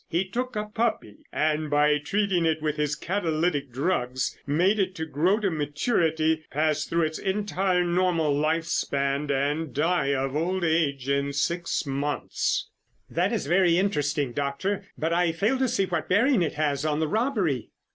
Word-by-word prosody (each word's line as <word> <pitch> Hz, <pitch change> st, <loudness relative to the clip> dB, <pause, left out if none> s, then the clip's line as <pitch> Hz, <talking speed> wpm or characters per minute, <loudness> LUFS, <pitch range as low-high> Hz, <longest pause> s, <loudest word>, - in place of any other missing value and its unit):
He 175 Hz, +3 st, 0 dB
took 250 Hz, +5 st, -3 dB
a 210 Hz, 0 st, -1 dB
puppy 210 Hz, -, -2 dB
and 155 Hz, 0 st, 0 dB
by 150 Hz, 0 st, +3 dB
treating 195 Hz, +3 st, 0 dB
it 160 Hz, -1 st, +1 dB
with 155 Hz, -1 st, -1 dB
his 150 Hz, 0 st, 0 dB
catalytic 160 Hz, -6 st, -1 dB
drugs, 130 Hz, -2 st, -1 dB
made 180 Hz, +9 st, +2 dB
it 185 Hz, -3 st, -1 dB
grow 180 Hz, +9 st, +2 dB
to 200 Hz, -4 st, 0 dB
maturity, 160 Hz, -, 0 dB
pass 155 Hz, +1 st, 0 dB
through 170 Hz, 0 st, 0 dB
its 155 Hz, 0 st, -2 dB
entire 190 Hz, -2 st, 0 dB
normal 175 Hz, -3 st, +1 dB
life 160 Hz, +3 st, +1 dB
span, 140 Hz, -2 st, -1 dB
and 145 Hz, +2 st, 0 dB
die 160 Hz, -1 st, +1 dB
of 135 Hz, +1 st, -2 dB
old 180 Hz, +4 st, 0 dB
age 150 Hz, -5 st, +1 dB
in 140 Hz, 0 st, 0 dB
six 170 Hz, +5 st, -1 dB
months." 140 Hz, +1 st, -1 dB, 0.4 s
"That -, -, +1 dB
is -, -, -1 dB
very 175 Hz, +2 st, +3 dB
interesting, 145 Hz, -8 st, 0 dB
Doctor, 165 Hz, -, -2 dB
but 160 Hz, +2 st, -1 dB
I 175 Hz, -1 st, +2 dB
fail 210 Hz, +11 st, 0 dB
to 260 Hz, -, +2 dB
see 225 Hz, -5 st, +1 dB
what 170 Hz, -4 st, -3 dB
bearing 230 Hz, +4 st, +4 dB
it 160 Hz, -, 0 dB
has 145 Hz, -2 st, 0 dB
on 155 Hz, -1 st, 0 dB
the 160 Hz, -, +1 dB
robbery." 195 Hz, -, 0 dB
160 Hz, 165 wpm, -26 LUFS, 145-185 Hz, 0.4 s, bearing